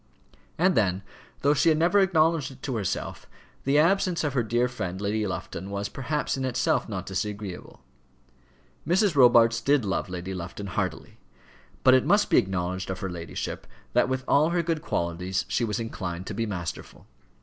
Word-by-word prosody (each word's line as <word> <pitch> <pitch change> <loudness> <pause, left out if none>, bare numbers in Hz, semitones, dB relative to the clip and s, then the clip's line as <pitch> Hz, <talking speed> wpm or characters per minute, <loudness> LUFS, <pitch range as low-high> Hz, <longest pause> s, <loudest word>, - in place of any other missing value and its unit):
And 185 +3 +3
then, 95 - +1 0.4
though 145 +1 +4
she 150 - +3
had 155 - +3
never 175 +5 +4
acknowledged 165 -6 +3
it 130 -1 -15
to 130 - -2
herself, 100 -5 -3 0.4
the 140 +2 +3
absence 175 +1 +3
of 145 -3 -1
her 130 - +2
dear 120 +2 +1
friend 95 -7 -5
Lady 105 +1 -1
Lufton 95 +1 -5
was 100 0 -3
perhaps 145 +3 -2
in 135 - -3
itself 125 -2 0
not 95 -3 -4
disagreeable. 100 0 -5 1.0
Mrs. 190 0 +3
Robarts 120 -3 +6
did 140 -1 +2
love 95 0 -2
Lady 90 +1 -5
Lufton 90 +3 -6
heartily; 95 -4 -4 0.6
but 130 - +7
it 130 - +5
must 205 0 +3
be - - +7
acknowledged 95 0 -2
of 95 -1 -4
her 95 - -3
ladyship, 85 -1 -5 0.3
that, - - +3
with 130 0 -1
all 150 +3 +4
her 170 0 +1
good 165 -2 -1
qualities, 90 - -2
she 120 - 0
was 110 -1 -1
inclined 95 -6 -5
to 110 - -5
be 115 +2 -2
masterful. 90 -4 -6
115 Hz, 175 wpm, -26 LUFS, 95-145 Hz, 1.0 s, but